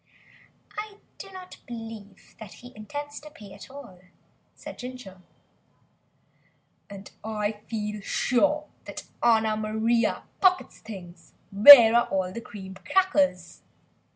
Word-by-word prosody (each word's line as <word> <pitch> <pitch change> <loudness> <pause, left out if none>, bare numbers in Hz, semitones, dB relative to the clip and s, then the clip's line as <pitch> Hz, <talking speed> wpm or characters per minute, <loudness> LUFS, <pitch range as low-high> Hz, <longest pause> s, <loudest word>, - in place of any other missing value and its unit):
"I 420 -1 -7 0.2
do 390 - -10
not 370 -1 -11
believe 225 -4 -11
that 215 -3 -11
he 245 +1 -15
intends 290 +7 -8
to 300 - -13
pay 205 -9 -14
at 200 - -13
all," 255 -10 -13 0.6
replied - - -11
Ginger. 250 -7 -10 1.7
"And 200 0 -11
I 210 -1 -4
feel 210 -2 -4
sure 295 +9 0 0.2
that - - -8 0.2
Anna 220 -2 +2
Maria 220 +2 -1 0.2
pockets 370 -2 +1
things 185 -5 -12 0.2
Where 225 +2 +10
are 240 0 +3
all 185 -1 -2
the 235 - -7
cream 190 -4 -10
crackers?" 285 - 0
225 Hz, 120 wpm, -25 LUFS, 205-280 Hz, 1.7 s, Where